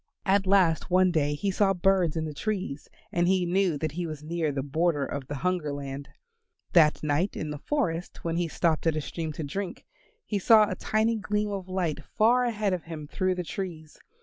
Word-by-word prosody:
At 195 -1 +2
last 185 -5 +3
one 185 0 +4
day 145 -3 +1
he 195 +6 -1
saw 195 0 +2
birds 180 -3 +2
in 160 - -1
the 155 - -5
trees 185 -5 -3 0.2
and 175 0 +1
he 185 -1 +3
knew 180 -2 +1
that 155 +1 -2
he 170 +3 -3
was 155 -2 -7
near 160 -1 -1
the 135 -1 -2
border 150 0 +1
of 140 -2 -5
the 145 - -4
Hunger 180 -5 0
Land. 140 0 -6 0.6
That 155 -4 +5
night 150 +6 0
in 155 - -3
the 150 - -5
forest 180 - -2
when 165 0 -1
he 175 -1 0
stopped 165 0 0
at 160 - +2
a 155 - -1
stream 160 +1 -4
to 155 - -5
drink, 185 +7 -5 0.4
he 205 - -1
saw 215 +2 +6
a 195 - -2
tiny 220 +4 +1
gleam 210 0 -1
of 190 -2 -5
light 170 -5 -2
far 240 - +3
ahead 215 -4 0
of 180 - -3
him 160 -2 -7
through 185 +3 0
the 180 - -3
trees. 165 -4 -6
175 Hz, 210 wpm, -27 LUFS, 155-195 Hz, 0.6 s, saw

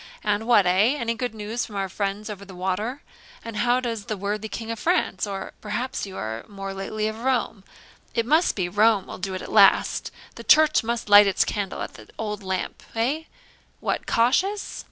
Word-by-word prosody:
And, 210 +2 0
what 220 -5 +5
eh! 200 +9 +4
any 230 -3 -1
good 245 -1 -4
news 215 +3 -3
from 210 - -8
our 195 -1 -1
friends 200 +2 -3
over 205 -2 -7
the 190 -2 -11
water? 200 +9 -2 0.4
and 230 -2 -6
how 245 +3 +3
does 230 -5 -4
the 215 - -3
worthy 210 +2 -3
King 225 +1 -5
of 230 - -5
France? 325 - +1
Or 195 -1 -5
perhaps 215 +2 -3
you 190 - -8
are 110 +1 -4
more 195 -1 -6
lately 215 +2 -3
from 220 +1 -10
Rome? 245 -6 0 0.5
it 230 -1 +1
must 315 +7 +3
be 185 -3 -1
Rome 205 +1 +3
will - - -8
do 190 0 -3
it 185 - -5
at - - -8
last 200 -2 +5 0.2
the - - -10
church 310 -3 +5
must 235 +1 -2
light 205 0 +8
its 195 - +2
candle 200 -2 -3
at - - -7
the - - -14
old 210 -2 -4
lamp. 190 -1 -3
Eh 270 +8 0 0.5
what, - - -2
cautious? 365 - +1
215 Hz, 200 wpm, -24 LUFS, 195-235 Hz, 0.5 s, light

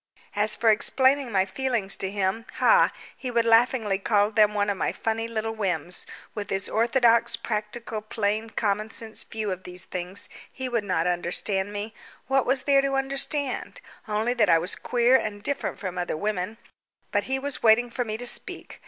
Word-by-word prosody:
As 210 +1 +4
for 225 -2 +4
explaining 260 +4 +2
my 190 -2 +2
feelings 230 -2 0
to 190 - -2
him 200 +3 -2
ha! - - +5 0.2
He 255 - -5
would 235 -1 +1
laughingly 225 -3 +3
call 205 0 +2
them 210 -1 +4
one 205 0 +1
of 200 - 0
my - - 0
funny 225 0 -2
little 225 -1 -3
whims. 180 -6 -2 0.3
With 205 -3 -5
his 195 0 -1
orthodox, 235 0 +3
practical, 215 0 -4
plain, 215 +1 -2
commonsense 220 +1 -2
views 215 -2 -4
of 185 0 -4
these 180 0 -6
things, 180 +2 -5 0.2
he 260 - -5
would 235 -3 -1
not 190 -2 0
understand 180 +3 0
me. 205 +2 -5 0.3
What 270 -1 +1
was 265 -1 +1
there 275 -1 +4
to 275 0 -1
understand? 270 0 -2 0.3
Only 220 +3 0
that 230 -4 +2
I 165 - +6
was 170 +4 -1
queer 245 +1 +3
and 205 -3 -5
different 280 +3 -2
from 185 -3 -5
other 175 -3 -2
women. 205 +3 -2 0.5
But - - 0
he 265 0 -1
was 280 +1 -3
waiting 235 +2 +4
for 245 - -1
me 215 -2 -4
to 245 - -7
speak. 240 - -3
220 Hz, 180 wpm, -25 LUFS, 200-240 Hz, 0.5 s, I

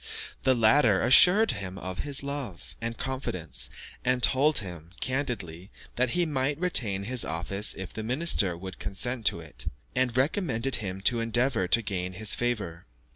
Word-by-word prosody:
The 130 - +3
latter 110 -3 +4
assured 185 - +6
him 95 -1 -6
of 95 -1 -7
his 140 -2 -1
love 140 -10 -6
and 115 0 -4
confidence, 125 -11 -3 0.3
and 125 0 0
told 145 +3 +3
him, 85 -5 -7
candidly, 110 - -3 0.3
that 125 0 +1
he 175 - +2
might 140 -1 -1
retain 110 - +1
his 125 +3 +1
office 90 +6 -2
if 95 -2 -8
the 110 - -5
minister 115 - +3
would 95 +1 -9
consent 115 +3 0
to - - +1
it, 70 -7 -9 0.3
and 125 -1 +1
recommended 135 - 0
him 95 -3 -5
to 120 +4 +2
endeavour 115 -3 0
to 115 +5 +3
gain 90 -2 -3
his 105 +3 +2
favour. 100 - -3
115 Hz, 160 wpm, -27 LUFS, 95-130 Hz, 0.3 s, assured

